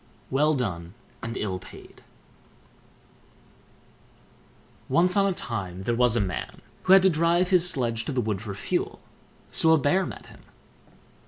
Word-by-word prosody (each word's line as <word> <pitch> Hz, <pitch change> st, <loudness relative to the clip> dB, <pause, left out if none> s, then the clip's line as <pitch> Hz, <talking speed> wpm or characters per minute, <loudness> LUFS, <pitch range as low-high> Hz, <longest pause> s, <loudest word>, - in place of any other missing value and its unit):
WELL 150 Hz, +3 st, +2 dB
DONE 90 Hz, -7 st, -4 dB, 0.3 s
AND 115 Hz, +1 st, -5 dB
ILL 95 Hz, -3 st, -3 dB
PAID -, -, -14 dB, 2.9 s
Once 180 Hz, +2 st, +3 dB
on 200 Hz, -1 st, +3 dB
a -, -, +1 dB
time 95 Hz, -, -5 dB
there 120 Hz, -, 0 dB
was 120 Hz, -1 st, +2 dB
a -, -, +2 dB
man, 95 Hz, -4 st, -4 dB, 0.2 s
who 185 Hz, -, +6 dB
had 195 Hz, -1 st, +7 dB
to 190 Hz, -, +6 dB
drive 170 Hz, +3 st, +2 dB
his 180 Hz, -2 st, +4 dB
sledge 120 Hz, -8 st, -1 dB
to -, -, -3 dB
the 130 Hz, -, -1 dB
wood 105 Hz, -4 st, -2 dB
for 105 Hz, -3 st, -6 dB
fuel. 100 Hz, -, -3 dB, 0.5 s
So 160 Hz, 0 st, +4 dB
a -, -, +5 dB
Bear 170 Hz, +7 st, +1 dB
met -, -, -9 dB
him. -, -, -16 dB
125 Hz, 155 wpm, -25 LUFS, 105-170 Hz, 2.9 s, had